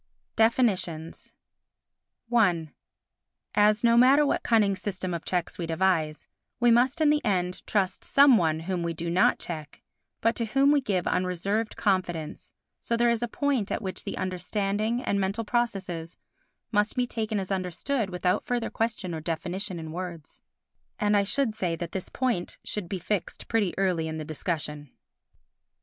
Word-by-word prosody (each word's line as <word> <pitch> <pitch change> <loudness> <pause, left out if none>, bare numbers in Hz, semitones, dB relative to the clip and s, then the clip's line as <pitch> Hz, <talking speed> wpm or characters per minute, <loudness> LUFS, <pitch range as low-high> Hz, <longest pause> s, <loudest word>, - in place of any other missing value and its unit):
Definitions 200 -9 +1 1.0
i 175 -8 +3 0.8
As, 210 +1 +4
no 235 0 +5
matter 265 +5 +6
what - - +1
cunning 210 -4 +3
system 185 -2 -3
of 170 - -4
checks 180 -1 -2
we 170 - -2
devise, 165 -2 0 0.3
we 240 -1 +5
must 255 +7 +3
in 300 -1 +5
the 300 0 +1
end 185 -4 0
trust 195 -3 0
some 275 -2 +6
one 160 -5 +1
whom 180 +1 -2
we 170 0 -2
do 170 +1 -3
not 180 +2 +4
check, 155 -4 -7 0.4
but 230 - +2
to 230 - 0
whom 275 +5 +3
we 290 -1 +4
give 195 -8 -1
unreserved 190 +5 -1
confidence, 175 -6 -1 0.3
so 235 - -1
there 235 0 +4
is 235 -1 0
a 240 - 0
point 265 -4 -1
at - - -2
which 190 -1 -5
the - - -5
understanding 200 +5 -1
and 200 - 0
mental 200 +4 -1
processes 195 -8 -2 0.5
must 210 -1 +1
be 250 - +1
taken 220 -3 -2
as 190 0 -5
understood 195 +5 -1
without 180 0 0
further 245 -2 -2
question 220 -6 -2
or 160 - -4
definition 180 +4 -2
in 160 -1 -6
words. 170 -3 -7 0.6
And 210 0 +2
I 205 - +5
should 225 +4 0
say 180 -5 -1
that 170 0 -6
this 190 - -5
point 245 -9 -1
should 195 -5 -4
be 195 - -2
fixed 190 +1 -3
pretty 215 -6 0
early 180 -4 +1
in 160 0 -4
the 155 - -5
discussion. 150 -2 -4
195 Hz, 165 wpm, -27 LUFS, 175-230 Hz, 1.0 s, matter